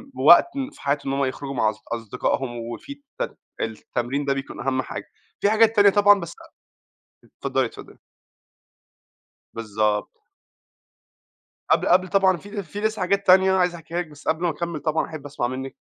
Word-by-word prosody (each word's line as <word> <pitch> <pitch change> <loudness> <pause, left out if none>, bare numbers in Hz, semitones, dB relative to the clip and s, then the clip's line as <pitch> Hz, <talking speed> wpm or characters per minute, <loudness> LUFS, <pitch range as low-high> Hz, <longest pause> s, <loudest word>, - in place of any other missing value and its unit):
وقت 165 - +7 0.2
في 305 - -17
حياتهُم 140 -1 -1
إن 135 - -1
هُم 140 - +2
يخرجوا 135 +1 -5
مع 110 -3 +2
أص 110 0 -8
أصدقائهُم 120 +2 -2
وفي 115 - -7 0.3
الت - - -3 0.2
التمرين 120 +5 -3
ده 140 - +2
بيكون 135 0 -6
أهم 130 0 0
حاجة، - - -7 0.3
في 200 - +3
حاجات 220 +1 +4
تانية 205 -1 +7
طبعًا 205 0 +5
بس 170 -3 -7 0.9
أ - - -21
اتفضلي، - - -1
اتفضلي. - - -10 1.6
بالضبط. 105 -1 -1 1.5
قبل - - +3
قبل 185 0 +4
طبعًا 190 0 +3
في 205 +4 -7
في 195 +4 -8
لسه 220 0 -1
حاجات 200 +2 0
تانية 190 +1 +6
عايز 180 -2 +2
أحكيها 165 0 -7
لِك، 175 - -7
بس 150 -1 -15
قبل 160 +2 0
ما 175 - +2
أكمل 170 0 -4
طبعًا 155 +2 0
أحب 155 -3 -9
أسمع 145 -4 -2
منِك. 130 +1 -6
155 Hz, 165 wpm, -23 LUFS, 130-190 Hz, 1.6 s, وقت